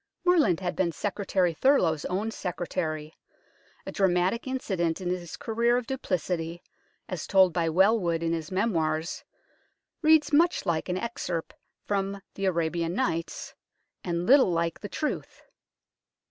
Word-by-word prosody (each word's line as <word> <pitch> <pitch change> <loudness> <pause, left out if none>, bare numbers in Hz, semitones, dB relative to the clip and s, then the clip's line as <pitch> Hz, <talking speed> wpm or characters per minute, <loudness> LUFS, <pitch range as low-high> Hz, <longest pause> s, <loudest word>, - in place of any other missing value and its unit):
Morland 300 - +4
had 180 -1 -2
been 175 -3 +1
Secretary 190 -1 0
Thurloe's 165 - +2
own 205 +5 -1
secretary. 165 -5 -3 0.7
A - - -5
dramatic 190 +4 +1
incident 190 -11 -1
in 180 -2 -3
his 175 -2 -5
career 235 +2 +1
of 250 - -2
duplicity, 175 -9 -3 0.4
as 185 -4 -5
told 190 -3 +5
by 165 -1 +1
Welwood 180 -2 +3
in 165 0 0
his 160 0 -4
Memoirs, 165 -5 0 0.8
reads 315 -1 +4
much 335 -2 +3
like 170 -1 -1
an 180 - 0
excerpt 185 -6 -4 0.3
from 200 0 -1
the 195 - -3
Arabian 170 -1 0
Nights, 165 -10 -2 0.5
and 170 -1 -2
little 265 -2 +6
like 170 -1 -1
the 205 - -7
truth. 305 - -4
180 Hz, 135 wpm, -27 LUFS, 165-220 Hz, 0.8 s, little